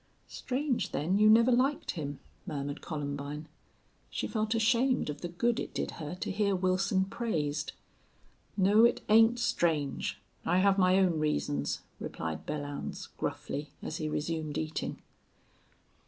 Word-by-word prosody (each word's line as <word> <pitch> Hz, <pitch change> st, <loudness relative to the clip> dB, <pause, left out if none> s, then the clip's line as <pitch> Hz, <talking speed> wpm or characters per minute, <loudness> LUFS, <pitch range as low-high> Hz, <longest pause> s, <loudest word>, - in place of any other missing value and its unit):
"Strange, 265 Hz, 0 st, -2 dB
then, 180 Hz, +7 st, +1 dB
you 215 Hz, 0 st, +7 dB
never 230 Hz, +3 st, +6 dB
liked 265 Hz, +4 st, +2 dB
him," 145 Hz, -3 st, -5 dB, 0.3 s
murmured 145 Hz, -1 st, -4 dB
Columbine. 145 Hz, 0 st, -4 dB, 0.6 s
She -, -, -3 dB
felt 215 Hz, 0 st, -1 dB
ashamed 235 Hz, -, +2 dB
of 145 Hz, -, -9 dB
the 175 Hz, -, -2 dB
good 230 Hz, +8 st, 0 dB
it -, -, -5 dB
did -, -, -1 dB
her 155 Hz, +3 st, -4 dB
to -, -, -1 dB
hear 200 Hz, 0 st, +1 dB
Wilson 185 Hz, +1 st, +2 dB
praised. 155 Hz, -10 st, -2 dB, 0.8 s
"No, 205 Hz, +3 st, +5 dB
it 235 Hz, -, +4 dB
ain't 225 Hz, +2 st, +6 dB
strange. 160 Hz, -, 0 dB, 0.2 s
I 175 Hz, -, +2 dB
have 195 Hz, +1 st, +4 dB
my 185 Hz, 0 st, +5 dB
own 180 Hz, -4 st, +3 dB
reasons," 75 Hz, -, -1 dB, 0.2 s
replied 80 Hz, -1 st, -5 dB
Belllounds, 145 Hz, -1 st, -4 dB
gruffly, 145 Hz, +1 st, -4 dB
as -, -, -4 dB
he 155 Hz, -1 st, -2 dB
resumed 155 Hz, -1 st, -2 dB
eating. 155 Hz, 0 st, -3 dB
180 Hz, 140 wpm, -31 LUFS, 150-220 Hz, 0.8 s, you